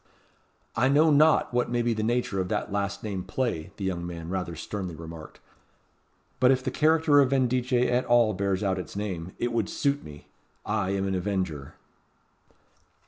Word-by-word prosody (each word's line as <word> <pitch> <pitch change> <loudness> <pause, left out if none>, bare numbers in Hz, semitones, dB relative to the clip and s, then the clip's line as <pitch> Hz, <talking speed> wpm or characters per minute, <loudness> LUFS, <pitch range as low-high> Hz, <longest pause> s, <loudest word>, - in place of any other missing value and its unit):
'" - - -39 0.3
"I 130 +3 +3
know 155 +3 +5
not 150 -2 +4
what 125 0 +1
may 120 0 0
be 120 0 +1
the 110 - -2
nature 115 -4 0
of 90 - -3
that 105 0 -2
last 100 0 -2
named 95 -4 -4
play," 105 -7 -2
the 100 - -6
young 90 -2 -2
man 85 -1 -6
rather 90 -2 -3
sternly 90 +1 -5
remarked; 80 0 -10 1.0
"but 125 - +5
if 130 -1 +3
the 130 - -2
character 155 0 +4
of 135 -2 +4
Vendice 130 -1 +1 0.2
at 125 +1 +1
all 120 -3 +4
bears 100 +1 -1
out 95 -2 0
its 90 - -8
name, 95 -4 -4
it 120 0 -2
would 115 -4 0
suit 140 0 0
me. 75 -1 -12 0.4
I 105 -3 -1
am 100 0 -1
an 95 - -1
avenger." 90 -7 -3
105 Hz, 185 wpm, -27 LUFS, 95-125 Hz, 1.0 s, know